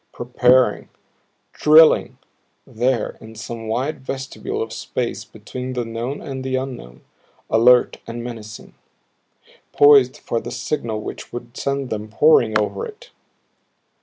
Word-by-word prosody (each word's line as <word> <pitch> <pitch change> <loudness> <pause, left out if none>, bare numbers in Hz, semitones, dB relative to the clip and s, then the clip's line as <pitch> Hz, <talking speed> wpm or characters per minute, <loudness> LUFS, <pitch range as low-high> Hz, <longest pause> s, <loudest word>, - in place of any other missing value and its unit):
Preparing, 125 +1 +2 0.6
DRILLING 155 +1 +5 0.5
there 120 0 -1
in 110 0 -12
some 115 +1 -7
wide 130 +6 -2
vestibule 135 0 -5
of 115 0 -4
space 115 +1 -4
between 125 +4 -8
the 125 -2 -2
known 115 +5 -5
and 135 -2 -6
the 130 0 -2
unknown, 125 - -6 0.5
alert 120 +2 +5
and 120 0 -6
menacing 110 -3 -9 1.0
poised 140 -3 +6
for 115 - -3
the - - -7
signal 120 -2 -3
which - - -8
would 120 -1 -8
send 140 -1 -3
them 105 0 -4
pouring 115 -3 +4
over 105 - -2
it. 465 +2 -10
120 Hz, 125 wpm, -21 LUFS, 110-135 Hz, 1.0 s, poised